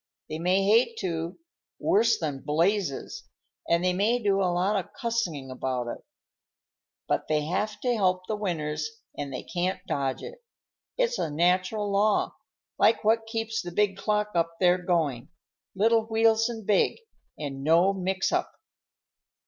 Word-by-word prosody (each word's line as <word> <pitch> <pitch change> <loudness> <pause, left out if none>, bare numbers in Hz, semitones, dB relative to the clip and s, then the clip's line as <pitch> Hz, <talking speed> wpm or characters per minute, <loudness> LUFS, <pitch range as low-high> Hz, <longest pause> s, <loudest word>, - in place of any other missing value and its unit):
They 155 - -4
may 185 +3 +2
hate 230 +3 +3
to, 170 -2 -3 0.4
worse 225 +2 +3
than 145 -5 -3
blazes, 170 - 0 0.4
and 170 +1 +3
they 180 0 +2
may 210 +6 +2
do 200 -4 +1
a 185 - +2
lot 185 +4 +1
of 195 -4 -3
cussin' 190 - -2
about 125 -1 -3
it, - - -5 1.1
but - - 0
they 150 -1 +1
have 205 +5 -2
to 250 -1 +1
help 185 -3 +1
the 215 - -2
winners 155 -7 -2 0.3
and 140 -1 -5
they 130 - -5
can't 185 +1 -2
dodge 135 -6 -2
it. 485 0 -10 0.5
It's - - +1
a - - -1
natural 185 +6 +1
law, 205 +1 +2 0.5
like 225 - +4
what 225 +1 +2
keeps 225 0 -2
the 175 - -7
big 200 +1 +1
clock 210 +1 0
up 165 -1 0
there 180 0 +4
going, 160 -9 -1 0.5
little 225 +3 +3
wheels 225 0 +3
and 225 -3 -6
big, 205 -1 +2 0.4
and 135 -2 -5
no 170 +6 +4
mix 190 0 -1
up." - - -1
190 Hz, 155 wpm, -27 LUFS, 165-215 Hz, 1.1 s, like